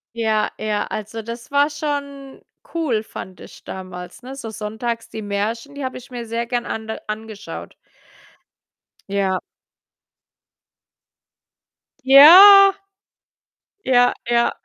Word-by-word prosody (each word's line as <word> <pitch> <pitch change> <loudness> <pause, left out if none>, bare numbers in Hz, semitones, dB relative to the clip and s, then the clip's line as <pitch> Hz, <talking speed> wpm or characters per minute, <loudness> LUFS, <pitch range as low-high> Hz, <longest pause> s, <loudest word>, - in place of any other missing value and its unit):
Ja, 220 -2 0
ja, 210 -1 -2
also 215 +1 -6
das 235 +3 -9
war 285 +1 +3
schon 280 -2 -6 0.3
cool, 265 -10 -1
fand 190 -3 -10
ich - - -14
damals, 185 +2 -9
ne? 265 +2 -9
So 235 -5 -7
sonntags 220 +2 -5
die 220 - -7
Märchen, 220 +7 -4
die 285 - -6
habe 260 - -5
ich 250 - -16
mir 240 -2 -7
sehr 230 +1 -4
gern 240 0 -2
ande 220 -1 -6
angeschaut. 215 -1 -8 1.4
Ja. 195 -2 0 2.6
Ja. 380 +9 +9 1.1
Ja, 245 -1 +3 0.2
ja. 235 0 +2
235 Hz, 110 wpm, -20 LUFS, 215-275 Hz, 2.6 s, Ja